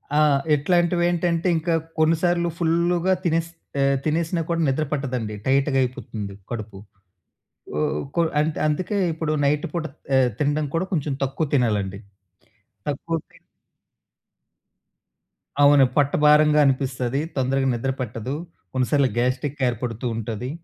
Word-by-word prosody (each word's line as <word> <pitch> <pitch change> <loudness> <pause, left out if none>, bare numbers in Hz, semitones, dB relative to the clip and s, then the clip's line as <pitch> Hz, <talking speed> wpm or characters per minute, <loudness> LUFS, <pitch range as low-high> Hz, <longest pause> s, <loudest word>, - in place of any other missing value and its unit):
ఆ! - - +4 0.4
ఇట్లాంటివి 175 +3 +2
ఏంటంటే, 175 0 0
ఇంకా 165 +1 -1 0.3
కొన్ని 160 +1 +4
సార్లు 175 -1 +2
ఫుల్‌గా 170 +2 +2
తినేస్ 165 -1 0 0.3
ఎ - - +3 0.2
తినేసినా 165 +2 0
కూడా 170 0 0
నిద్ర 135 +3 +1
పట్టదండి. 125 -7 -2
టైట్‌గా 135 +1 +2
అయిపోతుంది 110 -5 -5 0.2
కడుపు. 110 -4 -5 1.0
ఓహ్, 140 - -1 0.4
అందుకే 170 +7 -1 0.2
ఇప్పుడు 160 -1 -2
నైట్ 150 +3 +1
పూట 170 -2 -1 0.6
తినడం 150 +1 +1
కూడా 165 +2 +1
ఎ - - -32
కొంచెం 150 -3 -1
తక్కువ 135 +4 -2
తినాలండి. 105 -7 +1 0.9
తక్కువ 165 +3 -2
తిం - - -19 2.3
అవును. 145 -1 +7
పొట్టభారంగా 150 +1 +4
అనిపిస్తది. 130 -1 0 0.2
తొందరగా 135 0 +1
నిద్ర 120 +3 -1
పట్టదు. 125 +2 -4 0.4
కొన్నిసార్లు 130 +1 +2
గ్యాస్ట్రిక్ 130 +4 -1
ఏర్పడుతూ 120 0 -3
ఉంటది. 115 +2 -4
145 Hz, 115 wpm, -23 LUFS, 125-165 Hz, 2.3 s, అవును